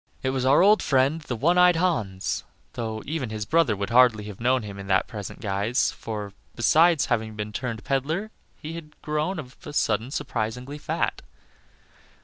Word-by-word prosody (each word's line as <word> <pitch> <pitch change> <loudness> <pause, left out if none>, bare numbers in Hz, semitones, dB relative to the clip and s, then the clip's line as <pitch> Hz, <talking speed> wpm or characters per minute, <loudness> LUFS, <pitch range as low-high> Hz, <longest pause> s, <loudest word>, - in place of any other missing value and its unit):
It 130 - +1
was 130 -1 -1
our 140 +6 +6
old 210 +2 +6
friend 140 +4 +2
the 130 -5 -4
one 170 +10 +3
eyed 180 -1 +6
Hans, 110 - -1 0.3
though 110 -2 -4
even 145 -5 -3
his 110 -1 -4
brother 160 -3 +3
would 100 +3 -4
hardly 120 -3 +5
have 105 -2 -9
known 125 0 +2
him 100 -1 -8
in 100 0 -8
his 95 - +4
present 105 -3 -8
guise, 100 +3 0
for, 105 -3 -6 0.2
besides 160 +6 +4
having 110 -1 -1 0.2
turned 115 -1 -4
peddler, 155 +11 -1 0.3
he 155 +2 -7
had 160 -2 -10
grown 155 +5 -1
of 130 -4 -8
a 150 -4 -8
sudden 115 -3 +1
surprisingly 125 +1 -4
fat. - - -2
125 Hz, 170 wpm, -25 LUFS, 110-155 Hz, 0.3 s, our